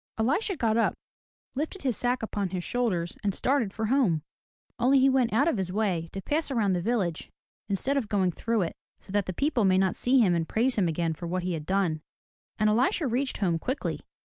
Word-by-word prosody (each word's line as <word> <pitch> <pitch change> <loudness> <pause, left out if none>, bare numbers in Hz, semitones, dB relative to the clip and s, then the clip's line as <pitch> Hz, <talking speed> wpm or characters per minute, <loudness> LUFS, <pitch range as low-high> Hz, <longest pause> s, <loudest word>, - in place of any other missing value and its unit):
Elisha 310 - +1
got 225 -3 +1
up, 230 - +2 0.6
lifted 310 +6 -4
his 255 -4 +1
sack 245 +1 0
upon 205 -3 -2
his 180 -1 -4
shoulders, 185 -9 -1
and 200 -2 0
started 260 -7 +1
for 220 +2 -3
home. 215 - +2 0.6
Only 260 +3 +4
he 270 0 +5
went 260 -3 +2
out 270 +8 +3
of 280 -11 +1
his 185 -1 -2
way 185 -5 -1
to 195 - -6
pass 305 +1 -1
around 220 -7 +1
the 175 - 0
village 190 -6 -1 0.4
instead 260 +8 +1
of 235 -6 -2
going 190 -4 +2
through 225 +3 0
it, 165 - -3 0.3
so - - -14
that 205 -1 0
the - - -1
people 255 - 0
might 190 -1 +4
not 190 -1 +2
see 255 +2 +2
him 195 -7 +4
and 165 -1 -1
praise 245 +4 +1
him 195 -5 +2
again 165 0 -1
for 170 +2 -7
what 180 +1 -2
he 180 0 -1
had 155 -2 -5
done. 185 -5 0 0.6
And 215 - +2
Elisha 245 +9 +2
reached 260 +2 -1
home 175 -5 0
quickly. 260 - -3
215 Hz, 220 wpm, -27 LUFS, 180-255 Hz, 0.6 s, he